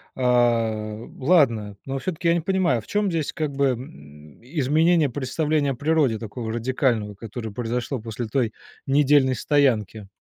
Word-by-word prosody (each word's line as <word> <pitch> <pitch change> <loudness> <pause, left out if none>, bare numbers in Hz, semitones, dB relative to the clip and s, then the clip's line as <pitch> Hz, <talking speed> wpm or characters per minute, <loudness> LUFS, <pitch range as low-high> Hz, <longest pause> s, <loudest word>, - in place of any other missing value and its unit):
А, 115 -3 +1
ладно, 125 - +2
но 135 0 -3
всё-таки 170 0 -3
я 170 - +5
не 170 - 0
понимаю, 175 - +1
в - - -19
чём 205 -1 0
здесь 160 -4 -1
как 155 -2 -3
бы, 140 0 +1
м, 75 - -8
изменение 155 +3 +2
представления 145 +2 0
о - - -3
природе 145 -4 +1
такого 115 +1 -5
радикального, 115 -3 0
которое 110 +2 -7
произошло 120 +3 -3
после 115 +1 -5
той 115 -1 0 0.3
недельной 140 -2 +3
стоянки? 110 -7 +1
130 Hz, 145 wpm, -23 LUFS, 110-150 Hz, 0.3 s, я